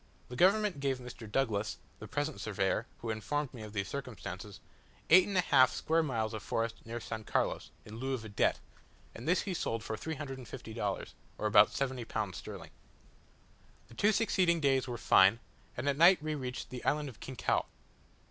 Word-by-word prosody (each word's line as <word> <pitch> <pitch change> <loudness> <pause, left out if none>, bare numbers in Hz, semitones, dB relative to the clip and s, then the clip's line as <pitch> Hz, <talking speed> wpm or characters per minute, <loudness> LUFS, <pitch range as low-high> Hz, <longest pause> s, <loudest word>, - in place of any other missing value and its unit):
The 125 - -7
government 195 - +3
gave 135 -2 0
Mr. 125 -3 -10
Douglas 110 -5 0 0.2
(the - - -8
present 145 +1 -2
surveyor, 105 +1 0
who 115 - -2
informed 140 +6 -2
me 120 - -9
of 105 -1 -8
these 100 -2 -2
circumstances) 100 -7 -6 0.5
eight 180 +2 +8
and 200 -2 -1
a - - +6
half 130 -6 +5
square 165 +1 +1
miles 115 -7 -1
of 110 - -4
forest 115 +1 -2
near 115 +1 -6
S. 120 - -9 0.2
Carlos, - - 0 0.2
in 110 +1 -9
lieu 130 +2 -1
of 115 -3 -7
a - - -7
debt; 100 - +1 0.5
and 115 - -9
this 180 +3 +3
he 195 - -3
sold 115 -9 -2
for 110 - -3
350 135 -4 -6
dollars, - - -3 0.2
or - - -4
about - - +7
70 130 -3 -2
pounds 105 -6 -3
sterling. - - -9 1.2
The - - -14
two 205 - +3
succeeding 185 -6 +2
days 135 -3 +2
were 120 -1 -4
fine, 95 0 +6 0.4
and 125 +4 -3
at 140 -1 +2
night 170 0 +7
we 155 0 -1
reached 130 -3 -5
the 125 -1 -6
island 150 0 +1
of 125 -6 -10
Quinchao. 130 -2 -1
130 Hz, 185 wpm, -32 LUFS, 110-150 Hz, 1.2 s, eight